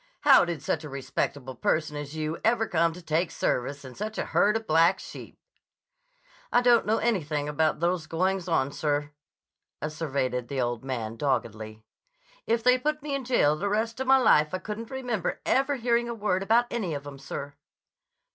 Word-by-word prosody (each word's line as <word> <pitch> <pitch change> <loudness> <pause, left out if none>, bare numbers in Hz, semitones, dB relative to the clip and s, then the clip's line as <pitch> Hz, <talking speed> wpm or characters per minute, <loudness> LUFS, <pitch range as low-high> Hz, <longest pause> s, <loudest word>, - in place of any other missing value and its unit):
How 275 -8 +7
did 170 -4 -4
such 155 +3 -1
a 150 - -7
respectable 135 0 -3
person 150 +5 0
as 145 +1 -6
you 155 +1 -3
ever 225 0 +2
come 170 0 +2
to 180 +1 -11
take 165 +2 0
service 140 +3 -2
in 130 - -9
such 215 +6 -5
a - - -1
herd 210 +2 +3
of 225 - -8
black 165 +3 +4
sheep?" - - -10 1.1
"I - - +5
don't 240 -3 +4
know 220 +1 +3
anything 155 -10 -1
about 155 +1 0
those 170 -2 0
goings 185 +2 0
on, 140 -5 +1
sir," 145 0 -1 0.7
asseverated 140 -5 -2
the 135 +1 -3
old 120 -1 -1
man 115 -4 -4
doggedly. 110 -5 -2 0.6
"If 230 0 +1
they 250 +1 +5
put 300 +2 -2
me 295 -2 -3
in 275 -2 -2
jail 195 - +3
the 200 +6 -2
rest 225 +3 -1
of 265 - -3
my 265 0 +7
life 155 -10 +4
I - - 0
couldn't 220 +3 -6
remember 245 -8 -3
ever 275 +2 +2
hearing 235 -1 +1
a 235 - -3
word 205 -4 0
about 230 +5 +3
any 195 -10 -2
of 140 0 -6
'em, 140 -1 -9
sir." 140 +1 -6
165 Hz, 185 wpm, -27 LUFS, 145-225 Hz, 1.1 s, How